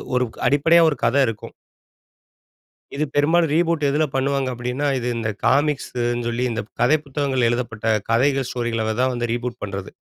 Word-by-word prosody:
ஒரு 125 Hz, 0 st, +2 dB
க் -, -, -15 dB
அடிப்படையா 165 Hz, +4 st, +4 dB
ஒரு 150 Hz, -, -2 dB
கத 120 Hz, -, +2 dB
இருக்கும். 110 Hz, -2 st, -6 dB, 1.4 s
இது 150 Hz, -, 0 dB
பெரும்பாலும் 160 Hz, +3 st, +3 dB
ரீபூட் 165 Hz, -1 st, +1 dB
எதுல 150 Hz, +3 st, +2 dB
பண்ணுவாங்க 135 Hz, 0 st, 0 dB
அப்டின்னா. 125 Hz, +4 st, -3 dB
இது 125 Hz, 0 st, -3 dB
இந்த 115 Hz, -1 st, -2 dB, 0.2 s
காமிக்ஸுன்னு 125 Hz, -4 st, 0 dB
சொல்லி, 120 Hz, +1 st, -1 dB
இந்த 115 Hz, -2 st, -2 dB
ப் -, -, -54 dB
கதைப்புத்தகங்கள் 140 Hz, -2 st, +1 dB
எழுதப்பட்ட 120 Hz, -2 st, -3 dB, 0.2 s
கதைகள், 135 Hz, +3 st, +2 dB
ஸ்டோரிகள 115 Hz, -2 st, -2 dB
தான் 130 Hz, 0 st, +2 dB
வந்து 120 Hz, -1 st, -2 dB
ரீபூட் 120 Hz, 0 st, -4 dB
பண்றது. 100 Hz, -1 st, -5 dB
125 Hz, 155 wpm, -21 LUFS, 120-145 Hz, 1.4 s, அடிப்படையா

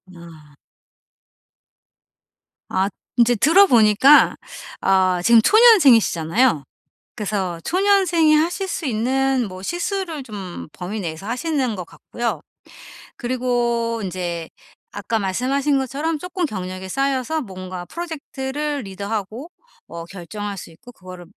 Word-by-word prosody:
아. 160 Hz, -4 st, -15 dB, 2.1 s
앗. 190 Hz, +2 st, 0 dB, 0.3 s
인제 240 Hz, 0 st, +4 dB
들어보니까 270 Hz, -, +5 dB, 0.5 s
아 185 Hz, -2 st, +2 dB
지금 230 Hz, +3 st, +6 dB
초년생이시잖아요. 245 Hz, -, +5 dB, 0.5 s
그래서 195 Hz, -5 st, -3 dB
초년생이 365 Hz, -5 st, +3 dB
하실 345 Hz, +5 st, 0 dB
수 365 Hz, -, -4 dB
있는 260 Hz, +2 st, 0 dB
뭐 185 Hz, -1 st, -9 dB
실수를 345 Hz, -, -3 dB
좀 200 Hz, -7 st, -8 dB
범위 195 Hz, +4 st, -6 dB
내에서 170 Hz, +1 st, -6 dB
하시는 255 Hz, -1 st, -1 dB
것 180 Hz, -2 st, -6 dB
같고요. 235 Hz, +7 st, -5 dB, 0.8 s
그리고 240 Hz, -2 st, -1 dB
인제 175 Hz, -3 st, -4 dB, 0.4 s
아까 205 Hz, +3 st, -3 dB
말씀하신 265 Hz, +9 st, 0 dB
것처럼 290 Hz, +5 st, -2 dB
쪼끔 360 Hz, +2 st, -3 dB
경력이 185 Hz, -6 st, -6 dB
쌓여서 275 Hz, +5 st, -1 dB
뭔가 185 Hz, -5 st, -8 dB
프로젝트를 295 Hz, -, -5 dB
리드하고 205 Hz, -, -5 dB, 0.4 s
뭐 170 Hz, 0 st, -8 dB
결정할 200 Hz, +3 st, -7 dB
수 -, -, -9 dB
있고 175 Hz, +9 st, -15 dB
그거를 185 Hz, -3 st, -12 dB
235 Hz, 260 characters per minute, -21 LUFS, 185-290 Hz, 2.1 s, 지금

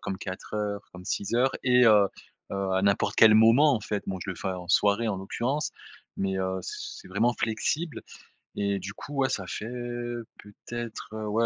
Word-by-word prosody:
comme 95 Hz, -1 st, -4 dB
4 95 Hz, +2 st, -7 dB
heures, 105 Hz, -1 st, -2 dB
comme 90 Hz, 0 st, -11 dB
6 100 Hz, +3 st, -2 dB
heures 130 Hz, +2 st, +3 dB
et 125 Hz, -1 st, +5 dB
heu 105 Hz, -3 st, +6 dB, 0.4 s
heu 100 Hz, -1 st, -1 dB
à 95 Hz, -, +2 dB
n'importe 100 Hz, 0 st, +2 dB
quel 110 Hz, -1 st, +8 dB
moment, 120 Hz, +7 st, +6 dB
en 110 Hz, -, -1 dB
fait. 105 Hz, 0 st, -3 dB
Bon, 95 Hz, -1 st, -3 dB
je -, -, -3 dB
le -, -, -4 dB
fais 95 Hz, -, -3 dB
en 90 Hz, -2 st, -5 dB
soirée 100 Hz, +4 st, +3 dB
en 100 Hz, -, -1 dB
l'occurrence, 130 Hz, +9 st, -2 dB, 0.5 s
mais, 95 Hz, 0 st, -1 dB
heu, 95 Hz, 0 st, -1 dB
c -, -, -5 dB, 0.3 s
c'est -, -, -14 dB
vraiment 110 Hz, +6 st, +2 dB
flexible. 140 Hz, +7 st, -1 dB, 0.6 s
Et 100 Hz, -1 st, 0 dB
du 100 Hz, +2 st, -6 dB
coup, 145 Hz, -, -9 dB
ouais 130 Hz, -, +3 dB
ça 95 Hz, -2 st, -3 dB
fait 110 Hz, +5 st, -5 dB, 0.7 s
peut-être, 115 Hz, +2 st, -7 dB
heu, 110 Hz, 0 st, -4 dB
ouais 115 Hz, +2 st, +2 dB
105 Hz, 200 wpm, -27 LUFS, 95-115 Hz, 0.7 s, quel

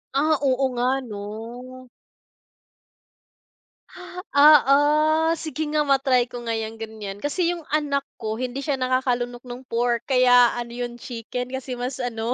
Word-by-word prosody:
Ah, 305 Hz, +2 st, +3 dB
oo 265 Hz, 0 st, +2 dB
nga 250 Hz, +2 st, 0 dB
'no. 235 Hz, +4 st, -9 dB, 2.5 s
Ah, 295 Hz, 0 st, +8 dB
oo, 305 Hz, +4 st, +3 dB
sige 315 Hz, 0 st, -6 dB
nga, 300 Hz, -1 st, +1 dB
ma-try 270 Hz, -3 st, +3 dB
ko 245 Hz, -1 st, -8 dB
nga 230 Hz, -1 st, -2 dB
'yang 220 Hz, 0 st, -4 dB
gan'yan. 210 Hz, -3 st, -7 dB
Kasi 345 Hz, +4 st, 0 dB
yung 345 Hz, -, -7 dB
anak 290 Hz, -2 st, 0 dB, 0.2 s
ko, 220 Hz, -2 st, -4 dB
hindi 255 Hz, +4 st, -4 dB
siya 290 Hz, -, 0 dB
nakakalunok 250 Hz, -1 st, -1 dB
nung 245 Hz, +1 st, -8 dB
pork 235 Hz, -1 st, -1 dB
kaya 245 Hz, -2 st, +5 dB
ano, 235 Hz, -1 st, -5 dB
yung 240 Hz, 0 st, -5 dB
chicken 245 Hz, +1 st, -6 dB
kasi 260 Hz, -1 st, -5 dB
mas 250 Hz, +1 st, -4 dB
ano, 235 Hz, 0 st, -2 dB
250 Hz, 140 wpm, -23 LUFS, 240-280 Hz, 2.5 s, Ah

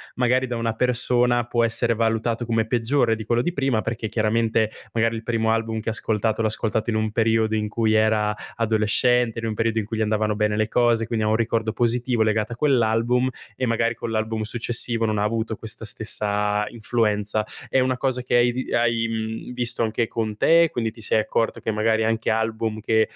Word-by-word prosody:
magari 125 Hz, +1 st, +2 dB
da 120 Hz, -, -3 dB
una 115 Hz, -1 st, -1 dB
persona, 120 Hz, 0 st, +1 dB
può 120 Hz, 0 st, 0 dB
essere 115 Hz, +1 st, 0 dB
valutato 115 Hz, +1 st, 0 dB
come 115 Hz, -1 st, 0 dB
peggiore 120 Hz, +1 st, +1 dB
di 110 Hz, -1 st, -7 dB
quello 120 Hz, +2 st, +1 dB
di 175 Hz, -, -1 dB
prima, 135 Hz, -7 st, 0 dB
perché 115 Hz, -1 st, -3 dB
chiaramente, 110 Hz, 0 st, +1 dB, 0.2 s
magari 115 Hz, 0 st, +1 dB
il 110 Hz, -, -8 dB
primo 115 Hz, -1 st, 0 dB
album 115 Hz, -1 st, -1 dB
che -, -, -3 dB
ha -, -, 0 dB
ascoltato 110 Hz, 0 st, -1 dB
l'ha 110 Hz, -, +2 dB
ascoltato 110 Hz, +1 st, -1 dB
in -, -, -1 dB
un 110 Hz, 0 st, 0 dB
periodo 110 Hz, -1 st, +1 dB
in 105 Hz, 0 st, -1 dB
cui 110 Hz, +1 st, 0 dB
era 110 Hz, -1 st, +2 dB, 0.2 s
adolescente, 115 Hz, +2 st, +2 dB
in 115 Hz, -, -4 dB
un 110 Hz, -, -2 dB
periodo 115 Hz, +1 st, 0 dB
in 105 Hz, -, -3 dB
cui 110 Hz, +1 st, -5 dB
gli -, -, -1 dB
andavano 110 Hz, 0 st, 0 dB
bene 105 Hz, 0 st, 0 dB
le 110 Hz, 0 st, 0 dB
cose, 120 Hz, -2 st, +2 dB
quindi 110 Hz, -2 st, -1 dB
ha -, -, +1 dB
un 110 Hz, -, +2 dB
ricordo 115 Hz, -1 st, 0 dB
positivo 120 Hz, -1 st, +1 dB
legato 110 Hz, +1 st, 0 dB
a -, -, -7 dB
quell'album. 125 Hz, -2 st, +2 dB, 0.3 s
E 130 Hz, -, 0 dB
magari 115 Hz, 0 st, 0 dB
con 115 Hz, -, -5 dB
l'album 110 Hz, 0 st, -1 dB
successivo, 115 Hz, 0 st, 0 dB
non 110 Hz, -1 st, 0 dB
ha 105 Hz, -, +1 dB
avuto 110 Hz, 0 st, -1 dB
questa 110 Hz, 0 st, -7 dB
stessa 105 Hz, -1 st, -1 dB
influenza. 110 Hz, -2 st, -1 dB, 0.2 s
È 130 Hz, -, +2 dB
una 130 Hz, 0 st, +1 dB
cosa 130 Hz, -1 st, -1 dB
che 125 Hz, -, 0 dB
hai 120 Hz, 0 st, +4 dB
vi 130 Hz, +2 st, -4 dB
hai, 115 Hz, -1 st, +1 dB
mhmm, 110 Hz, +2 st, -4 dB
visto 120 Hz, -1 st, -1 dB
anche 115 Hz, +1 st, 0 dB
con 110 Hz, -2 st, -3 dB
te? 165 Hz, +4 st, +5 dB
Quindi 115 Hz, -2 st, -2 dB
ti 115 Hz, -, -14 dB
sei 110 Hz, -, +2 dB
accorto 115 Hz, +1 st, -1 dB
che -, -, -2 dB
magari 110 Hz, +1 st, +1 dB
anche 115 Hz, 0 st, 0 dB
album 110 Hz, 0 st, -1 dB
che, 110 Hz, 0 st, +2 dB
115 Hz, 210 wpm, -23 LUFS, 110-120 Hz, 0.3 s, te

